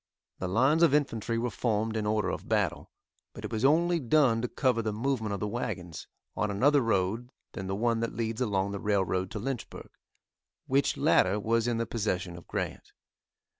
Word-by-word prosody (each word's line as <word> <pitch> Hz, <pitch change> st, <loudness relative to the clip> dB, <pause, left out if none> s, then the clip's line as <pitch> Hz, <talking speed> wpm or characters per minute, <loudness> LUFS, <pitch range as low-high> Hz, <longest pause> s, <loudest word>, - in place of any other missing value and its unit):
The 95 Hz, -, -2 dB
lines 130 Hz, -, +3 dB
of 165 Hz, -4 st, +5 dB
infantry 115 Hz, -6 st, 0 dB
were 120 Hz, +1 st, -1 dB
formed 110 Hz, -1 st, -1 dB
in 105 Hz, -1 st, -1 dB
order 105 Hz, 0 st, +1 dB
of -, -, -5 dB
battle, -, -, 0 dB, 0.4 s
but -, -, -8 dB
it -, -, -6 dB
was 110 Hz, 0 st, -2 dB
only 170 Hz, +5 st, +4 dB
done 130 Hz, -4 st, +3 dB
to 125 Hz, -, -1 dB
cover 125 Hz, -2 st, +1 dB
the 110 Hz, -1 st, -2 dB
movement 110 Hz, 0 st, -1 dB
of 100 Hz, -, -2 dB
the 105 Hz, -, -2 dB
wagons, 90 Hz, -7 st, -5 dB, 0.3 s
on 105 Hz, -, 0 dB
another 140 Hz, +8 st, +3 dB
road 115 Hz, +1 st, 0 dB, 0.2 s
than 95 Hz, -, -6 dB
the 95 Hz, -, -2 dB
one 115 Hz, +2 st, +1 dB
that 115 Hz, -, -3 dB
leads 115 Hz, 0 st, -2 dB
along 100 Hz, -4 st, 0 dB
the 100 Hz, -, -4 dB
railroad 95 Hz, -3 st, 0 dB
to -, -, -6 dB
Lynchburg, 125 Hz, +3 st, -5 dB, 0.7 s
which 135 Hz, +1 st, +1 dB
latter 95 Hz, +3 st, +3 dB
was 115 Hz, +2 st, +1 dB
in 120 Hz, -1 st, 0 dB
the 115 Hz, -, 0 dB
possession 95 Hz, -6 st, -2 dB
of 85 Hz, -, -12 dB
Grant. -, -, -4 dB
115 Hz, 190 wpm, -29 LUFS, 100-125 Hz, 0.7 s, of